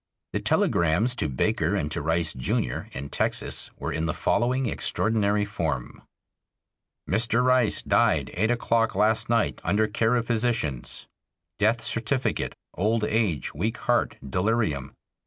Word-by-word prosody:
The - - 0
telegrams 85 +9 +2
to 75 - 0
Baker 65 - 0
and 75 - -2
to - - -2
Rice, 80 +1 0
Jr., 65 -1 -2
in 70 +2 -6
Texas, - - -1
were - - -4
in 80 0 -1
the - - -2
following 130 +2 +1
extraordinary 105 -2 +1
form: 80 -11 -3 1.1
Mr. 115 +4 +2
Rice 125 -3 +2
died - - +2
eight 110 +5 +1
o'clock 115 -1 +1
last 110 +1 +2
night 115 -1 +1
under 110 +2 +2
care 115 +2 +1
of 120 -1 0
physicians. 115 - -1 0.5
Death 110 +3 +2
certificate, 120 +4 -1 0.2
"old 110 +4 0
age, 105 - 0
weak 105 +9 -2
heart, - - +1
delirium." 90 - -1
110 Hz, 135 wpm, -26 LUFS, 80-115 Hz, 1.1 s, telegrams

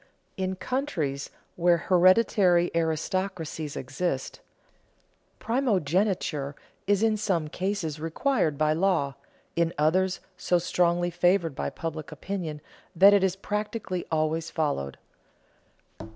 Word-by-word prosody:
In 190 0 -2
countries 180 - -2 0.3
where 175 0 +4
hereditary 180 0 +4
aristocracies 160 -1 -2
exist, 135 +1 -3 1.0
primogeniture 190 - 0 0.3
is 205 +1 +3
in 220 -1 +3
some 175 -7 -1
cases 180 -4 -3
required 165 - 0
by 155 +1 +2
law, 165 -5 +1 0.4
in 170 0 +1
others 180 +5 +2 0.2
so 180 - +2
strongly 175 0 +1
favored 175 -2 +2
by 135 - -3
public 160 -1 -6
opinion 170 -7 -5 0.3
that 195 +4 +8
it 200 -2 +4
is 190 -1 +2
practically 210 -2 -3
always 160 +1 0
followed. 140 - -2
175 Hz, 105 wpm, -27 LUFS, 155-195 Hz, 1.0 s, that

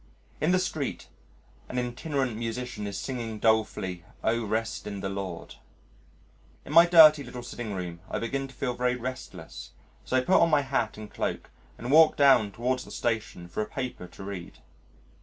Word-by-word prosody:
In 155 - +3
the 185 - +4
street 155 -6 -3 0.6
an 125 - -4
itinerant 125 0 -2
musician 115 -1 -4
is 100 -1 -5
singing 115 -4 -4
dolefully, 105 -5 +1 0.2
"O 115 +1 +1
Rest 110 +2 -2
in 100 -1 -5
the 95 - -2
Lord." 95 -3 -6 1.1
In - - -7
my 170 +2 +8
dirty 155 -4 +8
little 125 -1 -8
sitting 120 -4 -5
room 90 -2 -5
I - - -2
begin 135 +4 -2
to 135 - -16
feel 125 -1 -2
very 125 0 0
restless, 95 - -7 0.3
so 130 - +1
put 185 - +4
on 170 - +5
my 150 -2 +4
hat 130 -6 -1
and 105 0 -7
cloak - - -3 0.3
and 125 - -4
walk 160 +1 +7
down 135 -7 +5
towards 125 +4 -1
the - - -13
Station 110 -7 -3
for 90 - -3
a 105 - -2
paper 125 -8 -5
to 90 - -12
read. 95 -3 -7
120 Hz, 175 wpm, -28 LUFS, 105-135 Hz, 1.1 s, my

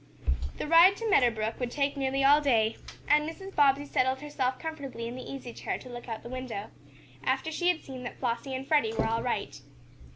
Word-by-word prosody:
The - - -4
ride 335 +5 +7
to 455 - -3
Meadow 275 - +5
Brook 220 0 -3
would 250 -2 -1
take 280 +2 0
nearly 270 0 0
all 290 +2 +6
day, 230 -6 +2 0.3
and 300 +1 +4
Mrs. 385 +4 -9
Bobbsey 285 -1 +4
settled 260 -1 +1
herself 265 -3 -2
comfortably 280 -7 -6
in 240 - -6
the 255 - -6
easy 265 -3 -7
chair - - -3
to 255 - -12
look 240 0 -8
out 225 - -3
of - - -19
the 235 - -8
window, 250 -5 -5 0.5
after 320 - 0
she 350 +3 -1
had 355 -2 +2
seen 260 -2 -8
that 245 - -7
Flossie 260 +2 -2
and 265 +1 -5
Freddie 290 -8 +3
were - - +1
all 225 +1 0
right. - - -3
265 Hz, 220 wpm, -29 LUFS, 240-295 Hz, 0.5 s, ride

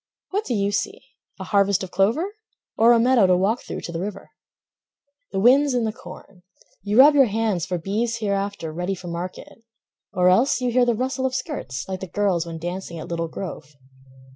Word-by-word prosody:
What 410 +3 -1
do 245 - -1
you 200 -1 0
see, 200 -2 -2 0.4
a - - -5
harvest 200 0 +2
of 185 - -7
clover? 250 - +1 0.4
Or 230 +2 +5
a 235 - +5
meadow 240 -4 +4
to 180 -1 +4
walk 205 +6 +1
through - - -7
to - - -6
the 165 - -4
river? 200 +3 -6 1.0
The 195 - -1
wind's 260 +5 +4
in 245 - +1
the 220 -1 -1
corn; 195 -4 -13 0.4
you 205 +3 -1
rub 285 +3 +8
your 280 -2 +6
hands 210 -5 -1
For 180 -1 -2
beeves 215 +7 -2
hereafter 200 -6 -3
ready 180 +4 -2
for 175 -1 -9
market; 180 +6 -7 0.5
Or 180 0 +3
else 235 +11 +3
you 250 -1 -1
hear 250 +1 +3
the 240 -1 +1
rustle 260 +2 -1
of 260 - -4
skirts 130 - -5
Like 190 -1 -4
the 190 - -6
girls 180 -3 0
when 165 -1 -6
dancing 175 +1 -5
at 160 - -8
Little 165 -1 -2
Grove. 160 -4 -8
200 Hz, 200 wpm, -23 LUFS, 180-240 Hz, 1.0 s, rub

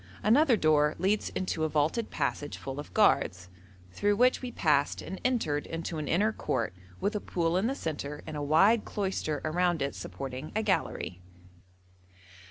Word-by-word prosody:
Another 245 +3 +5
door 150 -3 +3
leads 195 +4 +1
into 185 -4 -2
a 160 - +1
vaulted 155 +10 0
passage 145 0 -2
full 135 +1 -6
of 145 - -8
guards, 90 - +2 0.4
through 205 - +1
which 250 +4 +3
we 250 -1 -5
passed 150 -8 +1
and 190 - -7
entered 190 - 0
into 165 0 -4
an 150 - -4
inner 210 +6 +2
court - - -2 0.3
with 205 +2 -1
a - - +1
pool 170 -1 -1
in 190 +5 +2
the 270 - -1
centre 150 - -5
and 155 - -6
a 150 - -3
wide 195 +10 +4
cloister 190 -7 -2
around 175 +1 +1
it 140 0 -1
supporting 135 +2 -6
a 220 - +1
gallery. 95 - -1
165 Hz, 170 wpm, -29 LUFS, 150-210 Hz, 0.4 s, Another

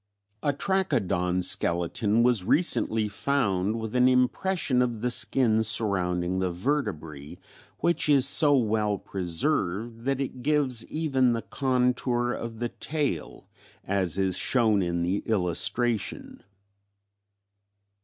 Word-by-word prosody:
A 145 - +1
Trachodon 120 - -1
skeleton 95 +6 +1
was 120 -6 +2
recently 110 - +1
found 105 -3 -1
with 110 +1 -6
an 125 0 +4
impression 130 +2 +1
of 120 -3 -2
the 125 +1 0
skin 110 0 +2
surrounding 95 -5 +1
the 95 -1 -1
vertebrae 85 - -4 0.4
which 170 -3 +1
is 140 -2 +5
so 145 0 +5
well 105 -3 0
preserved 100 - -3
that 135 0 -1
it 130 -2 -5
gives 135 -4 +1
even 135 -6 0
the 115 - -3
contour 125 -2 0
of 115 -1 -6
the 120 +1 -3
tail 145 - -4 0.4
as 95 -3 0
is 95 -2 0
shown 110 -5 +2
in 85 -1 -2
the 95 +4 -1
illustration 110 +3 -1
(fig. - - -29
115 Hz, 120 wpm, -26 LUFS, 95-130 Hz, 0.4 s, is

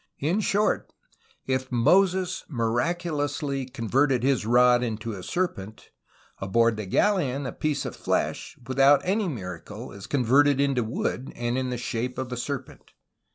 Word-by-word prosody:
In 165 +9 0
short, 210 0 0 0.5
if 130 0 -2
Moses 185 +9 +2
miraculously 145 +1 -1
con 125 -3 -6
verted 130 0 +2
his 130 -5 +1
rod 125 +1 +5
into 115 -1 -3
a 100 - -7
se[r]pent; 110 - -4 0.5
aboard 115 +4 +2
the 105 -2 -5
galeon 140 - +1
a - - -3
piece 150 -2 -2
of - - -5
flesh, - - -2
without 135 +3 +4
any 200 +2 +1
miracle, 105 - -7
is 100 -1 -10
converted 140 +2 +3
into 140 -3 +2
wood, 120 +3 -3
and 120 0 -2
in 130 0 -1
the 125 - -3
shape 120 +1 -3
of 130 -1 -4
a 125 - -3
serpent. 135 +1 -6
130 Hz, 150 wpm, -26 LUFS, 115-145 Hz, 0.5 s, rod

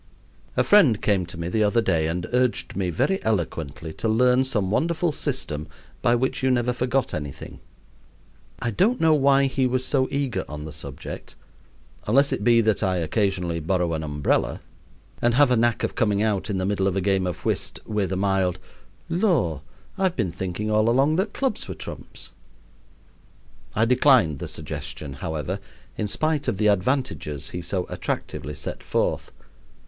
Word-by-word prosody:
A - - +4
friend 155 - +5
came 95 -4 +1
to 85 - -9
me 85 - -3
the 110 +5 +1
other 105 +3 +3
day 85 -8 +1
and 90 +2 -2
urged 125 -1 +1
me 95 -2 -1
very 190 - 0
eloquently 80 -6 -2
to 115 - -2
learn 125 +3 +4
some 105 -8 0
wonderful 170 +6 +1
system 105 - -3 0.3
by 120 - +3
which 130 +2 -1
you 130 - +2
never 125 -1 +2
forgot 125 +2 0
anything. 75 -3 -6 1.0
I 120 - -2
don't 215 - +2
know 160 -1 +5
why 140 -1 +4
he 135 -1 +1
was 130 +1 -1
so 130 -2 +1
eager 140 -4 -1
on 75 0 -6
the 80 - -7
subject, 70 -3 -8 0.7
unless 140 +6 +4
it - - -2
be 115 +1 +5
that 110 -2 +1
I 95 -3 +1
occasionally 90 0 0
borrow 85 +1 0
an 80 - -2
umbrella 75 -2 0 0.6
and 120 0 +3
have 140 -1 +5
a - - +5
knack 120 0 +2
of - - -1
coming 105 -2 +1
out, 105 -2 0
in 100 - -1
the 95 - -1
middle 95 -1 +1
of 95 - 0
a - - +2
game 95 -1 +1
of 90 -3 -5
whist, - - -1
with 105 -4 -1
a 95 - -1
mild 95 -2 +1 0.5
"Lor! 165 - +1 0.4
I've 190 -2 +1
been 100 -8 -1
thinking 95 +5 -3
all 110 +1 +3
along 135 +6 +3
that 200 +3 0
clubs 265 -6 -1
were - - -5
trumps." - - -8 1.4
I 110 - +3
declined 125 - +4
the - - -5
suggestion, 75 -2 -6
however, 80 -4 -3 0.4
in 105 - -2
spite 155 +6 0
of - - 0
the 105 +1 +3
advantages 100 - -1
he 90 - -4
so 90 +1 -2
attractively 75 +1 -4
set - - -6
forth. - - -1
105 Hz, 175 wpm, -24 LUFS, 85-130 Hz, 1.4 s, friend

